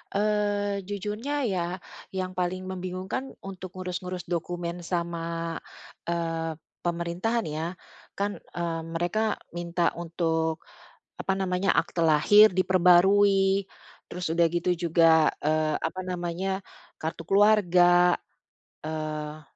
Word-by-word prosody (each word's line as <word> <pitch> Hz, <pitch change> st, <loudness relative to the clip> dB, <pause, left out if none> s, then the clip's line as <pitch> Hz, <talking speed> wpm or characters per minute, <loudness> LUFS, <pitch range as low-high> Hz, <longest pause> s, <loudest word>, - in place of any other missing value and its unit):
Eee, 205 Hz, -1 st, +1 dB
jujurnya 210 Hz, +8 st, -3 dB
ya, 185 Hz, -6 st, 0 dB, 0.5 s
yang 185 Hz, 0 st, -2 dB
paling 185 Hz, +1 st, -2 dB
membingungkan 185 Hz, +7 st, -5 dB
untuk 190 Hz, -1 st, -8 dB
ngurus-ngurus 180 Hz, -1 st, -4 dB
dokumen 175 Hz, 0 st, -3 dB
sama, 170 Hz, -1 st, -3 dB, 0.5 s
eee, 165 Hz, -1 st, -2 dB, 0.2 s
pemerintahan, 175 Hz, +7 st, -1 dB
ya. 155 Hz, +1 st, -3 dB, 0.5 s
Kan, 205 Hz, +1 st, -2 dB
eee, 170 Hz, -1 st, -4 dB
mereka 175 Hz, +6 st, 0 dB, 0.2 s
minta 175 Hz, 0 st, 0 dB
untuk, 165 Hz, -1 st, -1 dB, 0.5 s
apa 195 Hz, -, -2 dB
namanya, 190 Hz, 0 st, +1 dB
akta 170 Hz, -, 0 dB
lahir 195 Hz, +7 st, +6 dB
diperbarui, 190 Hz, +2 st, +4 dB, 0.5 s
terus 180 Hz, -1 st, -3 dB
udah 170 Hz, +1 st, +3 dB
gitu 175 Hz, +1 st, +1 dB
juga, 165 Hz, -2 st, +4 dB
eee, 155 Hz, 0 st, +1 dB
apa 185 Hz, -, -3 dB
namanya, 180 Hz, +1 st, -2 dB, 0.4 s
kartu 160 Hz, +1 st, -4 dB
keluarga, 180 Hz, -3 st, +5 dB, 0.7 s
eee, 155 Hz, -1 st, -4 dB
175 Hz, 100 wpm, -27 LUFS, 165-195 Hz, 0.7 s, lahir